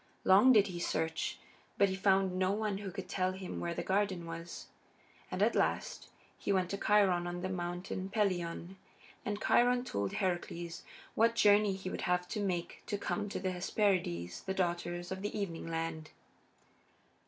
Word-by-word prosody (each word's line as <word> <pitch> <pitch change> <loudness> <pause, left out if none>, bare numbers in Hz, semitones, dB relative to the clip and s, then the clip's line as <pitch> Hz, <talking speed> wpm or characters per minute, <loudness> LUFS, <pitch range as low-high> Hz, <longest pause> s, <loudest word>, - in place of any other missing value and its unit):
Long 200 +7 +7
did 210 -5 +6
he 180 -3 -5
search, 160 -1 -1 0.4
but 200 - +4
he 190 - -2
found 190 -1 +3
no 185 0 +2
one 205 -1 -1
who 200 -1 -5
could 195 +2 -6
tell 185 -1 0
him 190 -1 -6
where 170 0 -2
the - - -2
garden 190 -3 0
was. 165 +1 -7 0.6
And - - 0
at - - +3
last - - -1 0.3
he - - -1
went 185 -2 +1
to 200 - -1
Chiron 190 -4 +3
on 175 0 -4
the 185 - -2
Mountain 180 +1 -4
Pelion, 185 -3 -1 0.5
and 205 0 -2
Chiron 245 +2 +3
told 100 - -2
Heracles 175 -2 -2 0.3
what 230 +1 +3
journey 205 -1 +5
he 190 -1 -5
would - - -4
have 180 0 0
to 215 - -3
make 180 -4 -2
to 205 - -1
come 205 0 -2
to - - -3
the 185 0 -1
Hesperides, 175 - 0
the 190 - -3
Daughters 175 -1 -2
of 190 0 -4
the 205 +1 -3
Evening 170 -6 -3
Land. 165 -1 -3
185 Hz, 175 wpm, -33 LUFS, 175-200 Hz, 0.6 s, Long